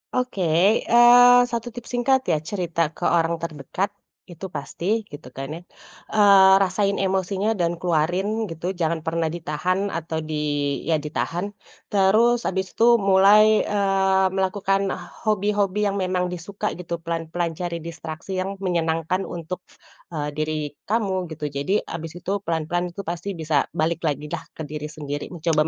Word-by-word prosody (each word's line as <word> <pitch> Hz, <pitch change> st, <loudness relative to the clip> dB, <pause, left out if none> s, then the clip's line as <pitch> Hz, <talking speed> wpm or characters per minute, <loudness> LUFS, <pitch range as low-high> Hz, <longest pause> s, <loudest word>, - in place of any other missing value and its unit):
Oke, 250 Hz, -6 st, -1 dB, 0.5 s
eee, 245 Hz, +1 st, +8 dB
1 235 Hz, 0 st, -3 dB
tips 240 Hz, 0 st, -9 dB
singkat 260 Hz, +2 st, +2 dB
ya, 155 Hz, -, +2 dB
cerita 170 Hz, -1 st, -1 dB
ke -, -, -9 dB
orang 170 Hz, -1 st, +2 dB
terdekat 170 Hz, +5 st, -3 dB, 0.4 s
itu 175 Hz, +3 st, -7 dB
pasti 185 Hz, +10 st, -2 dB
gitu 145 Hz, -3 st, -10 dB
kan 135 Hz, 0 st, -5 dB
ya, 170 Hz, -, -7 dB, 0.6 s
eee, 200 Hz, -2 st, +7 dB
rasain 195 Hz, +2 st, 0 dB
emosinya 195 Hz, +2 st, 0 dB
dan 170 Hz, 0 st, +1 dB
keluarin 175 Hz, +3 st, +1 dB, 0.2 s
gitu, 170 Hz, +3 st, -3 dB
jangan 170 Hz, -3 st, -1 dB
pernah 165 Hz, 0 st, -1 dB
ditahan 180 Hz, +5 st, -1 dB
atau 165 Hz, -1 st, -3 dB
di 155 Hz, 0 st, -4 dB, 0.5 s
ya 160 Hz, -, +3 dB
ditahan. 165 Hz, +5 st, -3 dB, 0.4 s
Terus 220 Hz, +5 st, +3 dB
habis 190 Hz, 0 st, -2 dB
itu 235 Hz, +1 st, +5 dB
mulai, 205 Hz, +1 st, +5 dB
eee, 195 Hz, -2 st, +2 dB
melakukan 195 Hz, +1 st, 0 dB, 0.4 s
hobi-hobi 205 Hz, -1 st, +1 dB
yang 200 Hz, 0 st, -1 dB
memang 180 Hz, -1 st, -1 dB
disukai 195 Hz, +4 st, -4 dB
gitu, 170 Hz, -1 st, -5 dB
pelan-pelan 165 Hz, 0 st, -2 dB
cari 170 Hz, -2 st, -4 dB
distraksi 165 Hz, +1 st, -7 dB
yang 195 Hz, +2 st, -3 dB
menyenangkan 170 Hz, +1 st, 0 dB
untuk, 170 Hz, +1 st, -6 dB, 0.5 s
eee, 150 Hz, -2 st, -3 dB
diri 155 Hz, 0 st, -3 dB, 0.2 s
kamu 195 Hz, -4 st, 0 dB
gitu. 150 Hz, -1 st, -4 dB
Jadi 145 Hz, +9 st, 0 dB
habis 165 Hz, 0 st, -7 dB
itu, 185 Hz, -, -4 dB, 0.2 s
pelan-pelan 170 Hz, +2 st, -1 dB
itu 200 Hz, -, -5 dB
pasti 175 Hz, +3 st, -4 dB
bisa 155 Hz, -3 st, 0 dB
balik 165 Hz, +1 st, 0 dB
lagilah 150 Hz, +3 st, -3 dB
ke 160 Hz, -, -6 dB
diri 150 Hz, 0 st, -5 dB
sendiri, 145 Hz, -1 st, -5 dB
mencoba 160 Hz, -2 st, +1 dB
180 Hz, 145 wpm, -23 LUFS, 160-200 Hz, 0.6 s, eee